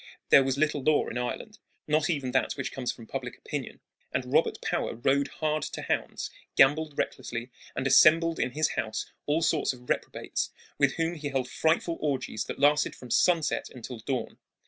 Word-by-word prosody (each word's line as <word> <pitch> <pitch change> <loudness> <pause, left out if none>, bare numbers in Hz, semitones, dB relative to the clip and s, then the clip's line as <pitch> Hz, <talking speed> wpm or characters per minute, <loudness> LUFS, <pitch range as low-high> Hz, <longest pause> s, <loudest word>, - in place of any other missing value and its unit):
There 135 - +8
was 135 0 0
little 150 -1 +1
law 155 +2 +3
in 120 - -3
Ireland, 210 - -5 0.3
not 155 +2 +2
even 140 -6 -1
that 130 - +1
which 140 - -4
comes 130 -2 -2
from 115 - -12
public - - -5
opinion; - - -6 0.3
and - - -3
Robert - - +3
Power - - -2
rode 135 +4 +2
hard 155 -1 -1
to - - -5
hounds, - - -2 0.2
gambled 150 +2 +4
recklessly, 120 +1 -3 0.2
and - - -2
assembled 165 +4 +6
in 125 - 0
his 155 +2 +2
house 110 - -2 0.2
all 155 +3 +2
sorts 155 -4 +2
of 125 -1 -15
reprobates, - - -2 0.3
with 140 -2 +4
whom 165 0 0
he 150 -3 -4
held 135 -2 -1
frightful 165 +4 0
orgies 135 -7 -1
that - - -5
lasted 145 +2 +3
from 125 -2 -11
sunset 165 -4 +2
until 125 -1 -8
dawn. 130 +3 -3
140 Hz, 180 wpm, -28 LUFS, 130-155 Hz, 0.3 s, There